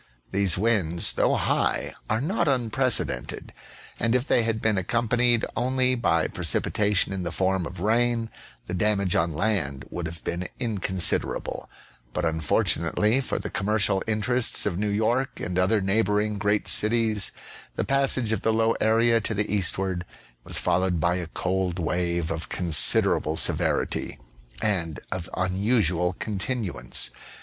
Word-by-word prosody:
These 100 -2 +2
winds, 95 -6 +1
though - - +2
high, - - 0 0.2
are 110 +1 0
not 175 +3 0
unprecedented, 125 - 0 0.5
and 115 +1 +1
if 125 +1 +1
they - - +3
had 115 -1 -1
been 110 -3 +1
accompanied 120 +4 +1
only 130 0 +1
by 85 -10 +1
precipitation 100 +4 +1
in 95 - -3
the 85 -2 -3
form 95 -1 0
of - - -8
rain, 115 +2 +1 0.3
the 90 - -6
damage 100 -1 +1
on 85 +1 +1
land 75 -8 -1
would 85 -2 -4
have 85 +1 -9
been 90 +1 -3
inconsiderable, 95 -7 -1 0.4
but, 90 - -1
unfortunately 85 - +1
for - - -3
the - - -5
commercial 100 -1 +1
inter 110 +3 +1
ests 120 - +2
of 85 - -1
New 105 0 0
York 115 +6 0
and 90 +1 -2
other 100 +3 +2
neighboring 105 +1 0
great 105 0 0
cities, 110 -2 +2 0.4
the - - -1
passage 135 -4 +2
of 110 - 0
the 110 - +1
low 115 +1 +2
area 115 +1 +3
to 110 +1 -1
the 105 0 -1
eastward 95 -2 -1 0.4
was - - -2
followed 90 0 +1
by 85 +3 +1
a 90 -2 -4
cold 90 +1 -2
wave 85 -1 -1
of 80 0 -4
considerable 85 -5 +3
severity - - 0 0.5
and 85 -8 -1
of 95 -2 -4
unusual 90 -2 +1
continuance. 100 - -2
100 Hz, 145 wpm, -25 LUFS, 90-115 Hz, 0.5 s, they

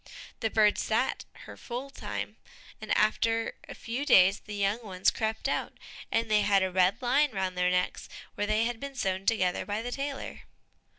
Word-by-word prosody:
The 220 - 0
bird 210 -1 +3
sat - - 0 0.2
her - - -10
full 255 +3 -6
time, - - -5 0.4
and - - -6
after 225 +1 +1 0.2
a - - -7
few 240 +5 -4
days 195 -8 +6
the 210 - -8
young 205 +3 0
ones 190 -4 +1
crept 220 0 -2
out, - - -2 0.4
and 230 - +2
they 215 -1 +3
had 200 -2 +3
a 190 - -1
red 185 +4 +3
line 280 +5 +3
round 190 -2 -2
their 180 0 +2
necks 180 0 -1 0.2
where 205 - -2
they 215 +1 +2
had 235 -1 -2
been 280 +1 -7
sewn 195 -5 -2
together 185 -6 +1
by 210 +2 -3
the 245 - -4
tailor. 275 +1 -5
215 Hz, 185 wpm, -29 LUFS, 190-235 Hz, 0.4 s, days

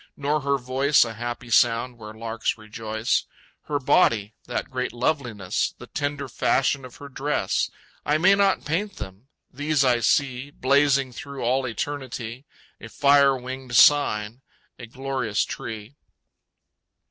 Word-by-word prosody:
Nor 145 +2 0
her 140 0 +1
voice 135 +2 +3
A 115 - -6
happy 120 +1 -6
sound 115 +3 +3
where 105 -1 -9
larks 115 +1 -2
rejoice, 110 +1 -2 0.4
Her 150 - -1
body, 110 -5 +2
that 125 - -4
great 125 -1 -2
loveliness, 120 -7 -1
The - - -10
tender 145 -1 -3
fashion 135 +2 +1
of 125 - -12
her 145 - -10
dress, 140 +2 -1 0.3
I 150 +1 +2
may 185 +5 +5
not 200 -1 +2
paint 195 +7 -2
them. 95 +7 -9 0.3
These 145 +1 +1
I 120 -2 +3
see, 130 +2 +1
Blazing 140 -1 +2
through 140 +3 -7
all 130 +2 +1
eternity, 130 -1 -5 0.3
A 115 - -10
fire 140 +1 +4
winged 130 0 -6
sign, 120 -6 +4 0.4
a 120 - -8
glorious 130 -3 -2
tree! 110 +2 -7
130 Hz, 135 wpm, -24 LUFS, 115-140 Hz, 0.4 s, may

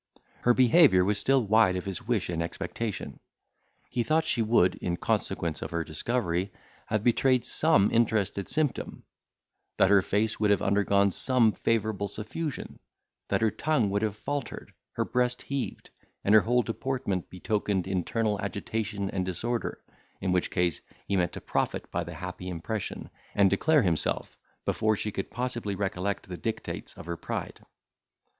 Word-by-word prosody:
Her 120 0 +4
behaviour 130 - +6
was 105 +1 +1
still 135 -3 +3
wide 105 -2 +4
of 90 - -3
his 95 -2 -4
wish 115 -6 +1
and 85 -1 -2
expectation. 105 +5 -4 0.7
He 120 - 0
thought 155 +6 +2
she 125 -6 +1
would, 110 -5 +4
in 85 -1 -2
consequence 85 -2 -1
of - - -4
her 85 0 -1
discovery, 90 +2 -1 0.4
have 110 -1 0
betrayed 125 +1 +3
some 155 -11 +3
interested 105 -4 +1
symptom; 150 -5 -1 0.7
that 95 - +4
her 100 -1 +7
face 105 +3 0
would 105 -1 +2
have 100 -2 +3
undergone 100 0 +3
some 125 +1 +3
favourable 110 -2 0
suffusion; 120 - -5 0.5
that - - 0
her 110 -1 +3
tongue 140 -10 +1
would 100 +1 0
have 110 -2 -1
faltered, 145 +2 -5 0.2
her - - -1
breast 125 0 0
heaved, 140 -2 -4 0.3
and 100 - +3
her 110 - +8
whole 125 +3 +2
deportment 115 -6 -2
betokened 100 0 -1
internal 100 +3 -1
agitation 100 0 -3
and 95 - -1
disorder, 115 +6 -3 0.4
in 95 - -1
which 90 -1 +1
case, 90 -4 0 0.2
he 100 - -1
meant 90 -3 +1
to - - -6
profit - - -2
by 85 - -1
the 85 -1 -8
happy 90 +2 -6
impression, 90 +5 -4 0.3
and 100 -2 +5
declare 150 +9 +4
himself, 85 -5 -1 0.3
before 110 0 +2
she 105 +1 -3
could 95 - -4
possibly 120 -5 -3
recollect 100 0 -2
the 90 -1 -6
dictates 110 +4 -5
of - - -9
her 85 0 -4
pride. - - -5
105 Hz, 160 wpm, -28 LUFS, 95-120 Hz, 0.7 s, her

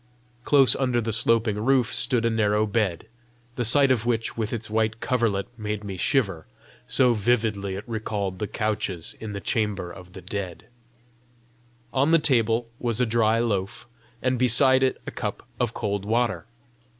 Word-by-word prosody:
Close 135 -1 +5
under 125 -3 0
the 115 -1 -2
sloping 110 -1 +2
roof 130 -1 +2
stood 120 -2 +1
a - - +3
narrow 105 -1 +1
bed, 105 -5 -1 0.5
the 120 - -1
sight 135 +4 +5
of 120 -4 +1
which 115 -1 -1
with 110 -1 -3
its 115 -1 -4
white 110 +1 -1
coverlet 115 -7 0
made 105 -1 -4
me 100 -2 -6
shiver, 95 - 0 0.4
so 125 -2 +4
vividly 105 -3 0
it 100 - -6
recalled 105 -4 -3
the 105 - -2
couches 105 -6 -3
in 110 -2 -6
the 100 - -4
chamber 100 -4 -2
of 90 0 -12
death. 95 -1 -6 1.3
On 140 +3 +2
the 165 - +6
table 120 -6 +1
was 120 -2 -1
a 125 - +3
dry 110 -1 +2
loaf, 110 -2 -2 0.4
and 130 -1 0
beside 130 +2 +5
it 130 -1 +1
a - - -5
cup - - -5
of 120 -2 -1
cold 100 -3 -2
water. 115 +4 -1
110 Hz, 160 wpm, -24 LUFS, 100-120 Hz, 1.3 s, the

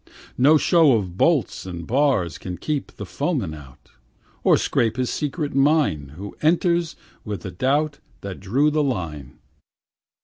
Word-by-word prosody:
No 145 +5 +5
show 160 -3 +4
of 95 -6 -1
bolts 145 - +1
and 85 -2 -6
bars 125 - +1
Can 90 -1 -6
keep 150 -3 -3
the - - -7
foeman 80 - -2
out, 70 -4 -14 0.5
Or - - +5
'scape 115 0 0
his 125 -1 -1
secret 150 0 -3
mine, 135 - +2
Who 100 +2 -8
entered 170 +1 +2 0.3
with 105 -5 -5
the 95 - -6
doubt 140 - 0 0.2
That 100 -2 -7
drew 130 +11 +1
the 155 0 +1
line. 80 - -4
130 Hz, 145 wpm, -22 LUFS, 90-150 Hz, 0.5 s, No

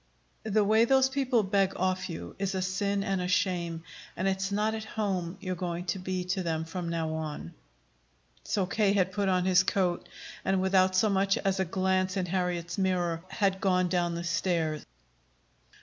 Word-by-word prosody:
The 215 0 +3
way 220 +3 +4
those 265 +1 +4
people 260 -4 +1
beg 195 -1 +2
off 185 0 -1
you 85 +1 -7
is 195 -1 -1
a 190 - 0
sin 200 +2 0
and 195 -2 -1
a 180 - -1
shame, 170 -3 0 0.3
and 185 - 0
it's 195 0 -1
not 210 +2 +1
at 220 -1 -4
home 195 -5 -2
you're 185 -1 -3
going 175 0 -3
to 190 - -7
be 185 0 -2
to 185 +1 -1
them 160 -2 -2
from 170 +1 -4
now 165 -1 -1
on." 155 - -5 0.9
So 195 - 0
K. 200 +2 +2
had 190 -2 +2
put 200 0 0
on 180 -1 +2
his 185 0 +5
coat 185 -2 0 0.3
and, 190 0 +1
without 190 0 +3
so 190 +4 +4
much 195 0 +2
as 195 -1 0
a 190 - +2
glance 185 +1 0
in 185 - 0
Harriet's 180 -1 -2
mirror, 175 -3 0
had 195 -2 0
gone 185 -3 +2
down 175 -1 0
the 170 - -4
stairs. 165 -2 -1
185 Hz, 185 wpm, -29 LUFS, 175-195 Hz, 0.9 s, his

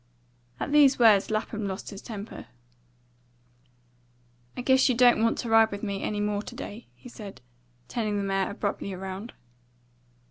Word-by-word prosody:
At - - -3
these 285 -2 +6
words 215 -5 +5
Lapham 215 -1 -2
lost 190 +2 -6
his 200 - -9
temper. 215 -2 -8 2.1
"I - - -2
guess 260 +1 +4
you 250 - +2
don't 245 -2 +5
want 230 0 +2
to 235 - -4
ride 225 0 +6
with 200 0 -7
me 200 -2 -3
any 210 - -2
more 205 0 -1
to - - -10
day," 220 +4 -8
he - - -14
said, 210 - -10 0.5
turning 215 -3 -2
the 200 - -1
mare 195 -1 0
abruptly 200 -2 -3
round. 190 +4 -7
215 Hz, 155 wpm, -27 LUFS, 200-235 Hz, 2.1 s, these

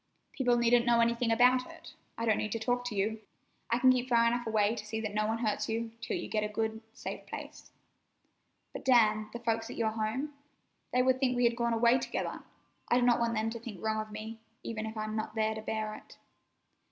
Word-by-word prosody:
"People 245 -3 +2
needn't 235 0 +4
know 235 -1 +5
anything 235 0 +2
about 250 +2 +4
it. - - -12 0.2
I 230 - -2
don't 220 -2 +2
need 215 - -2
to 230 - -2
talk 245 +2 0
to 240 -4 -3
you. 215 +3 -1 0.5
I 235 - +2
can 255 +1 +6
keep 255 0 0
far 235 -1 +4
enough 240 0 0
away 215 -1 +2
to 220 - -6
see 220 +1 -4
that 215 -2 -4
no 215 0 +1
one 220 +1 0
hurts 210 - -1
you, 225 0 -2
till - - -2
you - - -5
get 215 -1 -1
a - - 0
good, 220 +1 -2
safe - - -7
place." - - -8 1.0
"But, - - -7
Dan, 215 -4 +4
the - - -5
folks 225 -1 -1
at - - -7
your 220 -2 +1
home? 225 +7 -2 0.6
They 250 0 +3
would 260 0 +3
think 255 -2 +2
we 245 - +2
had 235 0 +3
gone 235 0 0
away 235 +2 +4
together! - - -3 0.5
I - - +4
do - - +1
not 240 -1 +4
want 230 0 0
them 220 +1 0
to 230 - -5
think 220 -5 -8
wrong 220 +1 0
of 215 0 -9
me, 220 +1 -7 0.2
even 220 -1 -4
if 220 0 -7
I'm 215 0 -3
not 215 0 -3
there 220 0 +1
to 220 - -6
bear 215 0 -3
it." - - -13
225 Hz, 235 wpm, -31 LUFS, 215-240 Hz, 1.0 s, can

